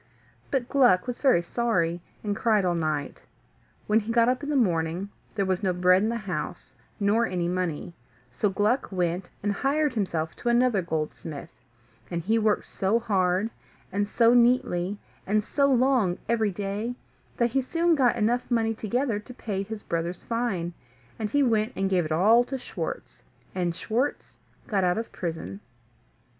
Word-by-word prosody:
But 260 -3 -1
Gluck 245 -11 +4
was 245 -1 -4
very 255 -11 +4
sorry, 175 -5 0 0.2
and 205 -1 -1
cried 215 -2 +2
all 175 - +2
night. 155 -4 -2 0.6
When 210 +1 +3
he 225 +1 -4
got 230 0 +4
up 250 +2 +1
in 290 - -5
the 295 - 0
morning 175 -4 +1 0.3
there 200 -2 +1
was 185 0 0
no 190 -3 +1
bread 180 +1 +4
in 215 - +1
the 235 - -1
house, 180 -6 -5 0.3
nor 215 +3 +2
any 175 -2 -1
money; 175 -2 -2 0.4
so 210 - +1
Gluck 210 +7 0
went 180 -1 -1
and 205 - +1
hired 285 +6 +1
himself 170 -7 -2
to 240 - -2
another 240 -4 +3
goldsmith, 155 -2 -4 0.6
and 170 -1 -3
he 220 +5 +2
worked 215 -1 +1
so 195 +4 0
hard, 195 -1 +1 0.4
and 205 +2 -1
so 235 +1 +4
neatly, 235 -6 +3 0.3
and 210 +2 +2
so 280 -1 +2
long 250 -8 +3
every 220 -2 +2
day, 205 +5 -3 0.4
that 235 -1 +2
he 270 +2 +2
soon 335 +6 +1
got 260 -6 +3 0.3
money 230 -2 +2
enough 225 - -7
together 235 0 0
to 230 +4 -11
pay 200 -6 -3
his 210 +2 -6
brother's 170 +1 -3
fine, 205 -8 -2 0.5
and 215 -1 -2
he 285 +4 +3
went 225 -1 +1
and 195 0 -1
gave 180 -3 +2
it 155 - -5
all 215 +9 +5
to 270 - -4
Schwartz, 485 - -6 0.3
and 175 -2 -1
Schwartz 240 +9 -2 0.3
got 200 -4 +1
out 180 +1 +2
of 230 - -4
prison. 160 - -5
210 Hz, 170 wpm, -26 LUFS, 180-240 Hz, 0.6 s, all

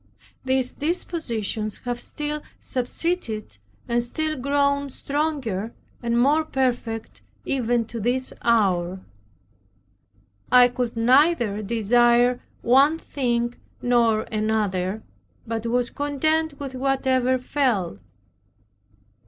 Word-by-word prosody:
These 260 -1 +1
dispositions 235 - -2
have 245 0 -2
still 300 +3 -4 0.2
subsisted, 250 - -3 0.3
and 235 0 +1
still 310 +6 -2
grown 280 +1 +1
stronger, 270 -8 -2 0.3
and 235 0 +1
more 290 +5 +4
perfect 245 -6 -2 0.2
even 240 -3 +1
to 230 +1 -7
this 250 +4 -1
hour. 190 -5 +2 1.5
I 250 0 +7
could 245 -1 -3
neither 245 -3 +3
desire 240 +3 +3 0.2
one 275 +6 +5
thing 240 -6 -1 0.3
nor 235 -3 +3
another, 215 -2 -1 0.4
but 230 0 -3
was 245 +1 0
content 290 +1 0
with 275 -2 -5
whatever 260 -1 +1
fell. 245 - -1
245 Hz, 95 wpm, -24 LUFS, 225-280 Hz, 1.5 s, I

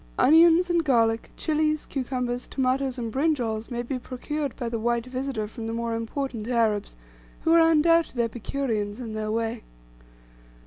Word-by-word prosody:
Onions 335 +4 +6
and 340 -1 +2
garlic, 230 -5 +2
chilies, 310 -1 0
cucumbers, 250 -2 -3
tomatoes, 265 0 0
and 230 -2 -4
brinjalls, 250 -7 0
may 240 -1 -3
be 255 +1 -3
procured 275 +3 -4
by 240 - -4
the 230 -1 -2
white 235 +1 0
visitor 255 -4 -3
from 225 +1 -7
the 225 - -3
more 230 0 -2
important 230 0 -4
Arabs, 225 - 0 0.5
who 325 - +1
are 335 - +7
undoubted 330 -3 +3
epicureans 230 -2 -2
in 230 -3 -6
their 215 0 -3
way. 225 +1 -2
245 Hz, 150 wpm, -26 LUFS, 230-280 Hz, 0.5 s, are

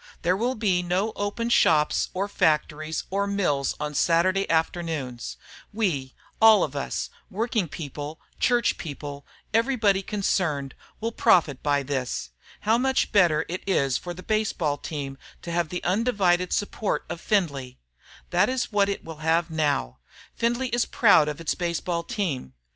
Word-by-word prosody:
There 180 +1 +3
will 240 +6 0
be 195 -5 +1
no 185 +5 0
open 220 +4 -2
shops 150 -8 +3
or 195 +2 0
factories 155 -3 0
or 200 +1 0
mills 175 -9 0
on 150 0 -3
Saturday 185 +5 +2
afternoons. 160 -7 -2 0.3
We, 170 - -1 0.3
all 220 -4 +8
of 145 - -3
us, 140 - -3 0.2
working 220 -2 -1
people, 150 0 -7 0.2
church 240 -2 +2
people, 145 -2 -7 0.3
everybody 225 -4 +3
concerned, 180 -9 -1 0.3
will 230 +1 -2
profit 160 - +3
by 145 -1 +1
this. 130 - -3 0.3
How 220 +3 +3
much 265 +1 +1
better 175 -8 +4
it 180 +3 -4
is 140 -9 +2
for 175 -1 -6
the 185 - -10
baseball 205 -9 0
team 140 -3 -5 0.2
to 170 - -5
have 170 -2 0
the 180 - -4
undivided 185 -3 +2
support 205 +1 -1
of 170 - -6
Findlay! 140 -11 -1 0.5
That 180 +5 +3
is 255 -2 -1
what 200 -1 +3
it 200 - -4
will 160 -1 -8
now - - -13
have. 160 - +1 0.4
Findlay 240 +2 0
is 240 0 +1
proud 200 -10 +5
of 150 0 -4
its 165 - -1
baseball 170 0 -2
team. 160 - -3
175 Hz, 150 wpm, -25 LUFS, 150-205 Hz, 0.5 s, all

